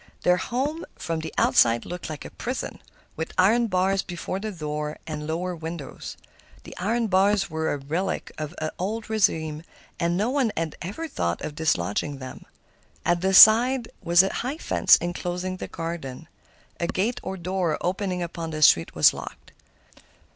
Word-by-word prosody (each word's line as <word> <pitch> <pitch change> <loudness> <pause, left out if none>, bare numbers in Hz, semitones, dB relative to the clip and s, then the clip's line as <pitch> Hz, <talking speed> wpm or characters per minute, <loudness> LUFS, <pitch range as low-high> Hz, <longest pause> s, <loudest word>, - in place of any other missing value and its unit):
Their 180 0 +4
home 280 - -2
from 165 -1 -3
the 160 0 -5
outside 115 0 +4
looked 180 -1 -6
like 155 -2 -7
a - - -8
prison, - - -5 0.3
with 160 - -5
iron 225 +6 +4
bars 190 0 +1
before 180 +1 -5
the 215 +1 -4
door 150 -3 -4
and 150 -1 -5
lower 175 +3 -2
windows. 160 -2 -7 0.5
The - - -11
iron 225 +5 0
bars 195 -1 +2
were 160 0 -1
a - - -1
relic 160 +8 -3
of 155 +2 -6
the 155 0 -3
old 210 +4 -2
régime, 160 -8 0 0.4
and 170 0 +1
no 215 +6 +1
one 265 -5 +1
had 165 -1 -2
ever 210 - -5
thought 85 - -2
of 150 - -4
dislodging 145 - -1
them. 130 -1 -9 0.6
At 175 0 +2
the 190 +1 +2
side 235 +4 +8
was 175 +2 +5
a 190 - -2
high 265 +5 -3
fence - - +5
enclosing 180 +1 -3
the - - -6
garden. 165 -3 -6 0.5
A 170 - 0
gate 215 +8 -1
or 190 0 -5
door 180 -2 -1
opening 180 0 -1
upon 165 -1 -5
the 155 -1 -1
street 80 - +5
was - - +6
locked. - - -9
175 Hz, 170 wpm, -25 LUFS, 160-195 Hz, 0.6 s, side